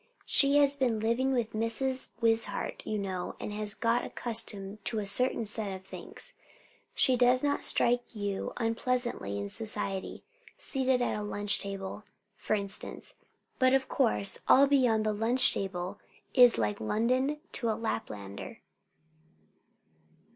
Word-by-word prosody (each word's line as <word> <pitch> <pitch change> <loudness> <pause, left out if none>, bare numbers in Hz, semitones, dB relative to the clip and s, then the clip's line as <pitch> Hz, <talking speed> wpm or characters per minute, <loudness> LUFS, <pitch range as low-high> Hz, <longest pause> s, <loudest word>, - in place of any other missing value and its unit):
She 280 0 +3
has 285 -1 +4
been 250 -5 0
living 235 +5 0
with 240 -4 -1
Mrs. 230 +4 +2
Wishart, 225 0 0
you 215 - -1
know, 190 -3 -4
and 210 - -5
has 210 0 0
got 230 +1 +1
accustomed 215 -3 -1
to 230 - 0
a 210 - -2
certain 230 +3 +2
set 210 -1 +1
of 190 - -11
things. 345 - -5 0.6
She 260 - +3
does 250 +1 +4
not 285 0 0
strike 240 0 +1
you 205 -2 -3
unpleasantly 235 - -1
in 100 0 -4
society, 200 - -3 0.3
seated 260 -2 +1
at - - -1
a - - -4
lunch 205 0 0
table, 195 +1 -6 0.3
for 215 - -1
instance; 200 -1 -5 0.5
but 260 0 +4
of 265 -1 0
course 105 -1 +1
all 275 +2 +7
beyond 250 -6 +2
the 215 - +1
lunch 230 +5 +3
table 190 +1 -4 0.3
is 245 -3 +7
like 105 -1 -1
London 255 - 0
to 235 -4 -1
a 220 - 0
Laplander." 100 - -5
225 Hz, 140 wpm, -29 LUFS, 200-250 Hz, 0.6 s, all